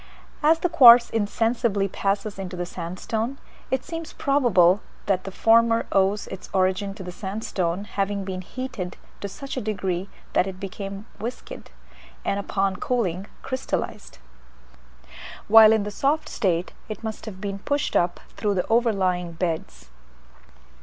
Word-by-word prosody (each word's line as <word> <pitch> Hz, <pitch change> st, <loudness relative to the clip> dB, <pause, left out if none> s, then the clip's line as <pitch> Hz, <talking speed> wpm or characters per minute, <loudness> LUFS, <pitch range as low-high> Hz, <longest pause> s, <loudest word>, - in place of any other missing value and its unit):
As 315 Hz, +2 st, +5 dB
the 355 Hz, -, 0 dB
quartz 240 Hz, -6 st, +8 dB
insensibly 225 Hz, -1 st, +1 dB
passes 200 Hz, +1 st, -2 dB
into 185 Hz, -1 st, -5 dB
the 175 Hz, -, -2 dB
sandstone, 190 Hz, +9 st, -4 dB, 0.3 s
it 260 Hz, -1 st, 0 dB
seems 330 Hz, -1 st, -6 dB
probable 210 Hz, -, +3 dB, 0.2 s
that 190 Hz, -2 st, 0 dB
the 195 Hz, -, -5 dB
former 230 Hz, +2 st, +4 dB
owes 195 Hz, +1 st, +2 dB
its 190 Hz, -, -8 dB
origin 190 Hz, +1 st, +1 dB
to 200 Hz, -, -8 dB
the 180 Hz, -, -6 dB
sandstone 190 Hz, -2 st, -3 dB
having 200 Hz, -1 st, -2 dB
been 190 Hz, -1 st, -4 dB
heated 240 Hz, -3 st, -6 dB, 0.2 s
to 200 Hz, -, -4 dB
such 275 Hz, +5 st, -7 dB
a -, -, -1 dB
degree 195 Hz, -3 st, -2 dB, 0.2 s
that 185 Hz, -, +3 dB
it 190 Hz, -1 st, -7 dB
became 195 Hz, +1 st, -6 dB
viscid, 235 Hz, +4 st, -7 dB, 0.6 s
and 200 Hz, -, 0 dB
upon 195 Hz, -1 st, -1 dB
cooling 195 Hz, -6 st, -1 dB, 0.2 s
crystallized. 260 Hz, -, -4 dB, 1.3 s
While 220 Hz, 0 st, +9 dB
in 220 Hz, -2 st, +3 dB
the 210 Hz, -, -4 dB
soft 285 Hz, +8 st, 0 dB
state 180 Hz, -4 st, 0 dB, 0.2 s
it 215 Hz, +1 st, -6 dB
must 220 Hz, 0 st, -5 dB
have 190 Hz, -3 st, -7 dB
been 200 Hz, 0 st, -4 dB
pushed 285 Hz, +7 st, -1 dB
up 175 Hz, 0 st, +2 dB, 0.2 s
through 205 Hz, -2 st, 0 dB
the 180 Hz, -, 0 dB
overlying 190 Hz, -7 st, +1 dB
beds. 160 Hz, -, -4 dB
200 Hz, 145 wpm, -24 LUFS, 185-230 Hz, 1.3 s, While